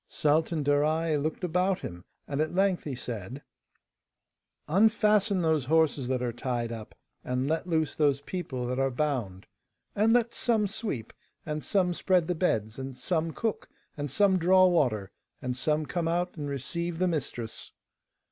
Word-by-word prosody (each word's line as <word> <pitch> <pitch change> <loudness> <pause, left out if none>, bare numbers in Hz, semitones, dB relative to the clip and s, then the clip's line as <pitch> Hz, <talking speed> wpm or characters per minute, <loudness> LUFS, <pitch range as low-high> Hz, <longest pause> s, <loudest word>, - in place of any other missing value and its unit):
Sultan 155 +1 +1
Darai 155 +3 +2
looked 155 +5 -2
about 180 +2 +1
him, 85 0 -7 0.2
and 140 +1 -1
at 155 +3 -1
length 190 -1 +2
he 140 -3 -3
said: 120 +2 -6 1.2
'Unfasten 210 +1 +3
those 160 -4 +2
horses 150 -3 +2
that 130 -1 -1
are 120 -1 -1
tied 120 -1 -2
up, 110 -2 -8 0.3
and 125 +1 -1
let 160 +3 -1
loose 160 -3 0
those 145 -3 +2
people 145 -5 -4
that 125 +1 -2
are 135 0 +2
bound. 125 -9 -2 0.5
And 215 +2 +3
let 235 0 +3
some 225 -4 +1
sweep, 195 - -5 0.3
and 150 0 -3
some 185 -3 +1
spread 180 -1 +2
the 180 - +1
beds, 115 - 0
and 135 -1 -6
some 165 -2 -1
cook, 225 +5 -3 0.3
and 145 -1 -4
some 190 +6 +3
draw 185 +2 +6
water, 125 - +2 0.3
and 125 0 -3
some 150 +4 0
come 170 +1 -2
out 175 +2 -1
and 145 -3 -4
receive 170 +5 -3
the 185 +2 +2
mistress. 125 -8 -4
155 Hz, 160 wpm, -28 LUFS, 130-180 Hz, 1.2 s, draw